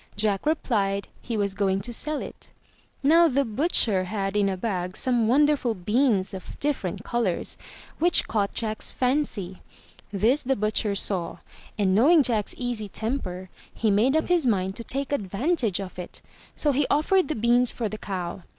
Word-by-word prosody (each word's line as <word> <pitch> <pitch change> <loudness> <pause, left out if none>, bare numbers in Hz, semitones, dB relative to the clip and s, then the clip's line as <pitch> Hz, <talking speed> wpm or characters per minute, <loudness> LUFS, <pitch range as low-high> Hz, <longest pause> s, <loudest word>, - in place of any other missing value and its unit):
Jack 205 +4 0
replied 200 -10 0
he 230 -3 -4
was 200 -2 0
going 195 -1 0
to 240 +4 -4
sell 300 +5 -1
it. - - -11 0.5
Now 330 +4 +6
the 280 -1 +1
butcher 220 - +2
had 195 0 -3
in 205 -1 +2
a 190 - -2
bag 185 -3 -3
some 240 -3 +1
wonderful 275 -2 +3
beans 210 +1 +1
of 190 - -8
different 210 -9 -2
colours, 230 -8 -1 0.4
which 345 +2 +3
caught 205 -2 0
Jack's 220 -1 -1
fancy. 250 -9 -2 0.5
This 220 +8 +2
the 270 +1 0
butcher 215 -1 0
saw, 185 -3 -1 0.4
and 195 -3 +2
knowing 290 - +5
Jack's 220 -5 0
easy 240 -4 -2
temper, 190 -5 -4 0.2
he 220 -2 0
made 230 +8 +3
up 315 - 0
his 345 -6 +2
mind 190 -3 0
to 230 - -6
take 275 +3 -2
advantage 225 - 0
of 185 -2 -7
it, 180 - -7 0.3
so 295 - +1
he 280 +1 +1
offered 315 +4 +2
the 310 - -2
beans 240 +2 +3
for 230 - -3
the 215 +1 -6
cow. 185 -1 -5
220 Hz, 170 wpm, -25 LUFS, 195-270 Hz, 0.5 s, Now